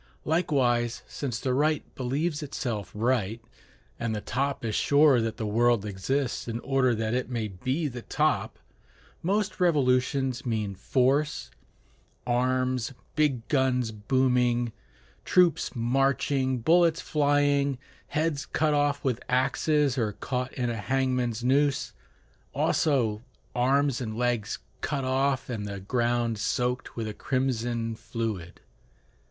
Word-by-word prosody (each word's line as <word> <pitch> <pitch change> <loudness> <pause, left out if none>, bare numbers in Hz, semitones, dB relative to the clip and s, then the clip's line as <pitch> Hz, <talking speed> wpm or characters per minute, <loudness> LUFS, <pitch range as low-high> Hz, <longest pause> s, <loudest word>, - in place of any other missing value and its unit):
Likewise, 130 -8 +1
since 125 -5 -4
the 130 - -1
right 150 +2 0
believes 145 +5 -1
itself 120 - -4
right, 115 -1 0 0.6
and 115 -2 -1
the - - -2
top 135 +4 -2
is 110 - -1
sure 145 0 +4
that 115 -1 -2
the 110 - -3
world 115 0 +2
exists 120 +8 -2
in 115 0 -3
order 130 -3 +2
that 110 0 -1
it 125 +1 -1
may 115 -4 -2
be 130 - -2
the 125 -3 -6
top, - - 0 0.6
most 205 +4 0
revolutions 130 -5 +2
mean 110 -5 -2
force, 135 +8 0 0.7
arms, 130 0 0 0.2
big 135 -7 +1
guns 130 -4 +1
booming, 120 +1 +1 0.5
troops 180 -5 +3
marching, 130 +2 +1
bullets 165 +6 +4
flying, 145 -2 +2 0.3
heads 150 -2 -1
cut 155 -1 +1
off 145 -1 +1
with 125 -3 0
axes 135 +2 +2
or 110 -3 0
caught 125 +2 -3
in 120 -2 -1
a 115 - -3
hangman's 125 0 0
noose; 140 +2 +2 0.6
also 115 -8 +1 0.3
arms 135 +1 +2
and 110 -2 -4
legs 120 -4 0 0.2
cut 140 -2 -2
off, 135 +1 +1
and 110 -5 -4
the 100 -1 -5
ground 120 +2 0
soaked 125 +4 -1
with 115 -2 -3
a 105 - -4
crimson 120 -3 -1
fluid. 110 -5 -5
125 Hz, 125 wpm, -27 LUFS, 115-140 Hz, 0.7 s, sure